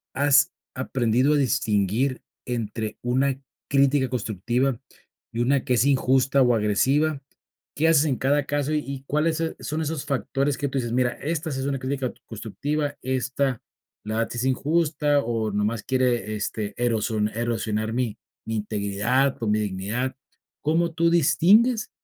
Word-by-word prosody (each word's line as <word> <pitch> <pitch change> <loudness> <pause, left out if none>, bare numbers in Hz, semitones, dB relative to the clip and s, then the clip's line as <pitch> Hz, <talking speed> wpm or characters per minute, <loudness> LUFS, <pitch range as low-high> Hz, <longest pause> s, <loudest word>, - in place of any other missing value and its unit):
has 140 0 +4 0.2
aprendido 125 +3 +1
a - - +3
distinguir 125 -1 +1 0.2
entre 110 -2 -3
una 130 +2 +1 0.3
crítica 140 -1 +3
constructiva 120 +2 -1 0.5
y 115 - -1
una 135 +2 +2
que 125 - +1
es 120 +1 +3
injusta 135 0 +3
o 125 -2 +4
agresiva? 135 +8 +1 0.6
¿Qué 155 - +2
haces 160 -2 +5
en 135 -4 +1
cada 145 +3 +1
caso 145 +1 -1
y 155 - +2
y 135 -2 -7
cuáles 155 +3 +1
se 165 0 -2
son 155 +2 -3
esos 155 -2 -3
factores 140 0 -1
que 145 - -1
tú 135 - -2
dices: 120 -3 -2
"Mira, 125 0 +2
esta 160 +1 -3
sí 135 - -3
es 135 - -2
una 140 -1 -1
crítica 130 -1 -2
t - - -27
constructiva, 145 +7 -3
esta 130 0 -1 0.4
la 110 +1 -2
verdad 115 +1 -2
es 120 - -1
injusta, 145 +2 +1
o 115 -4 -1
nomás 105 +2 -1
quiere, 120 -5 0
este, 105 0 -3
eroso 110 -2 0 0.2
erosionar 110 -2 -1
mi 120 -3 -1 0.3
mi 115 - -3
integridad 105 +6 0
o - - 0
mi 105 0 +2
dignidad"? 105 +6 -2 0.5
¿Cómo 165 +2 +1
tú 170 0 +2
distingues? 185 - +4
130 Hz, 160 wpm, -24 LUFS, 115-145 Hz, 0.6 s, haces